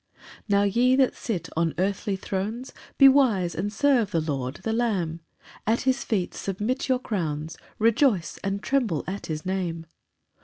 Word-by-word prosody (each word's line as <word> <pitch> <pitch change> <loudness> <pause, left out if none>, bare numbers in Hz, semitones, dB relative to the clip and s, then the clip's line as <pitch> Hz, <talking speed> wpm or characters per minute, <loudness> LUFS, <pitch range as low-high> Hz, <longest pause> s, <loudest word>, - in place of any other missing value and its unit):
8 - - -32 0.3
Now, 200 0 +4
ye 240 +6 +3
that 265 -1 +3
sit 200 -8 -3
on 165 0 0
earthly 195 +2 -1
thrones, 205 +7 -4 0.2
Be 275 - +9
wise, 235 -11 +4
and 205 +2 -2
serve 240 -2 +2
the 170 -4 0
Lord, 140 -4 -3
the 225 - -1
Lamb; 195 -9 0 0.5
at 225 +2 +2
his 260 +1 +1
feet 195 -6 -1
submit 210 +8 -3
your 260 - +4
crowns, 165 - -3 0.2
Rejoice 230 - +2
and 200 +1 -2
tremble 235 - 0
at 195 +2 -5
his 155 +1 -4
name. 175 -3 -2
200 Hz, 160 wpm, -25 LUFS, 175-240 Hz, 0.5 s, Be